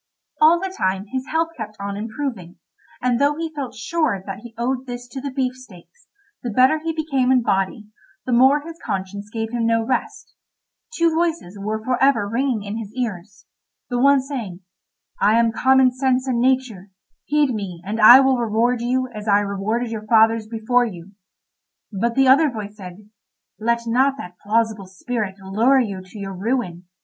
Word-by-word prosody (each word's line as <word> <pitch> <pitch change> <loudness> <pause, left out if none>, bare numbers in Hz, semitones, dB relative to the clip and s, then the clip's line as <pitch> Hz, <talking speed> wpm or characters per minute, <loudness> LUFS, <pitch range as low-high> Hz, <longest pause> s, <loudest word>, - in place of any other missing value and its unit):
All 325 +3 +6
the 380 0 -4
time 190 - -1
his 260 +3 -4
health 325 +1 0
kept 215 -2 -7
on 200 0 -4
improving, 215 - -5 0.5
and 250 0 +1
though 285 +1 +3
he 325 0 -5
felt 280 -4 -5
sure 230 - -1
that 195 -1 -6
he 230 0 -13
owed 255 +2 -2
this 245 0 -7
to 265 +1 -7
the 280 - -4
beefsteaks, 255 - -6 0.3
the 245 - -4
better 255 +8 +3
he 325 +1 -3
became 285 -5 0
in 255 -2 +3
body, 195 +1 -1 0.4
the 255 - -3
more 265 +4 +5
his 330 +2 -10
conscience 200 -1 -4
gave 225 -1 -4
him 235 -1 0
no 230 0 +2
rest; 255 +1 -3 0.6
two 335 -1 +2
voices 325 - -1
were 215 +2 -3
for 250 +1 -1
ever 270 -7 +3
ringing 235 0 -1
in 205 +2 -5
his 210 -2 -7
ears—the 220 +2 -6
one 280 +1 +5
saying, 235 -10 -6 0.6
"I 215 +2 +4
am 230 -1 +3
Common 260 +2 +4
Sense 255 0 0
and 245 -2 0
Nature; 250 -7 0 0.4
heed 295 -3 +2
me, 195 -5 -5
and 215 +3 -3
I 240 +5 +10
will 265 -1 +3
reward 235 +1 +1
you 255 +2 0
as 210 0 -8
I 205 0 +4
rewarded 210 +4 -2
your 215 -1 -6
fathers 225 0 +4
before 230 +2 +1
you." 185 -4 -9 0.8
But 230 +4 -1
the 270 -1 +4
other 285 +4 +5
voice 210 -4 -7
said: 195 0 -11 0.5
"Let 235 +2 0
not 260 +4 +2
that 180 -7 -10
plausible 215 -2 0
spirit 195 +1 -4
lure 220 +8 +2
you 200 -6 -2
to 185 +3 -14
your 195 -1 -6
ruin. 190 -3 -3
235 Hz, 180 wpm, -21 LUFS, 205-265 Hz, 0.8 s, I